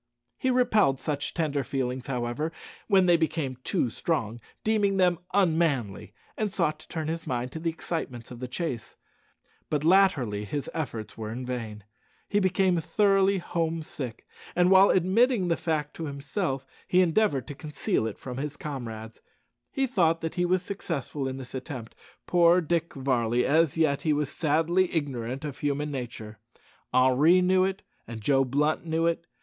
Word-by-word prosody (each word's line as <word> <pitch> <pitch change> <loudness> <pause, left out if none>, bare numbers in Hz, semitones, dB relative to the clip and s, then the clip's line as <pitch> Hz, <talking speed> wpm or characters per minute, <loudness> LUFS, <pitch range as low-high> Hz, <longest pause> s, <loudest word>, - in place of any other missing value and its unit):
He 260 - +1
repelled 220 - +3
such 145 +1 -2
tender 150 -5 0
feelings, 130 0 -3
however, 125 +4 -2 0.4
when 195 -3 +5
they 175 -1 +5
became 155 -5 -1
too 120 - 0
strong, 120 -9 -2 0.2
deeming 205 -3 +2
them 180 -3 +3
unmanly, 160 - +1 0.2
and 215 -2 -1
sought 155 -6 0
to - - -15
turn 160 -2 -4
his 165 0 -4
mind 125 -1 -2
to 160 - -6
the 165 +1 -1
excitements 145 -8 -5
of 120 - -8
the 125 - -4
chase; 125 -4 -4 0.7
but 150 -1 0
latterly 155 - +3
his 140 +7 -4
efforts 115 -9 -5
were 110 -1 -4
in 125 +3 -5
vain. 115 -4 -5 0.4
He 205 - +2
became 185 -2 +2
thoroughly 195 +1 +3
home 165 -2 -2
sick, 125 -7 -7 0.3
and 180 +1 +4
while 190 +1 +7
admitting 190 +2 +3
the 170 - +3
fact 155 -3 -2
to 165 - -4
himself, 140 0 -3 0.2
he 180 - +4
endeavoured 165 - +2
to - - -4
conceal 150 -6 -2
it 110 - -6
from 125 -1 -7
his 145 +1 -4
comrades. 115 -6 -7 0.5
He 270 -1 +1
thought 170 -10 +2
that 160 -1 -3
he 175 - 0
was 180 +1 +1
successful 150 -8 -3
in 130 0 -4
this 130 -1 -8
attempt. 130 -3 -6 0.3
Poor 175 0 +5
Dick 170 0 -1
Varley! 125 -3 +1
as 160 +1 +3
yet 155 -4 +2
he 155 - +2
was 145 -1 -1
sadly 165 +4 +1
ignorant 135 -3 -3
of 145 -3 -6
human 145 +1 -1
nature. 115 -5 -6 0.5
Henri 130 +8 +5
knew 185 +1 +3
it, 190 +1 -2 0.2
and 115 -1 -6
Joe 135 +5 +3
Blunt 145 +4 0
knew 165 0 0
it. 170 0 0
155 Hz, 165 wpm, -27 LUFS, 130-175 Hz, 0.7 s, while